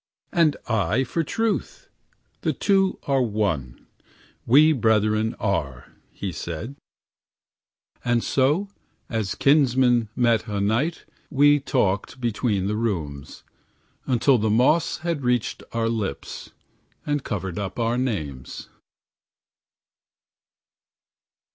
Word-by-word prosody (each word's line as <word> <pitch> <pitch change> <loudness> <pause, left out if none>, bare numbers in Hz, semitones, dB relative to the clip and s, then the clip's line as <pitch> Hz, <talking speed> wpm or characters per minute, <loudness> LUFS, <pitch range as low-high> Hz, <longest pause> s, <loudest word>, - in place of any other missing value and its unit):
"And 165 -4 +3
I 110 +2 +1
for 165 +6 -2
truth, 225 - -2 0.5
the - - 0
two 195 -2 +2
are 135 -2 +1
one; 100 - -2 0.6
We 150 +6 +6
brethren 110 -3 +1
are," 70 - -2 0.2
he 100 - -5
said. 85 - -6 1.3
And 120 -1 +1
so, 145 +9 +1 0.4
as 110 -4 -2
kinsmen 130 -5 +3
met 120 -2 +2
a 105 -2 -2
night, 115 +12 0 0.2
We 145 0 +5
talked 125 -4 -1
between 110 -4 -1
the 105 +2 -1
rooms, 80 -11 -4 0.6
Until 125 +1 +3
the 110 +1 0
moss 125 +9 +3
had 170 -4 -1
reached 125 -2 0
our 115 -1 0
lips, 110 -10 -4 0.6
And 145 -1 -1
covered 95 -3 -4
up 95 -2 -5
our 115 0 0
names. 75 - -4
115 Hz, 105 wpm, -24 LUFS, 100-135 Hz, 1.3 s, We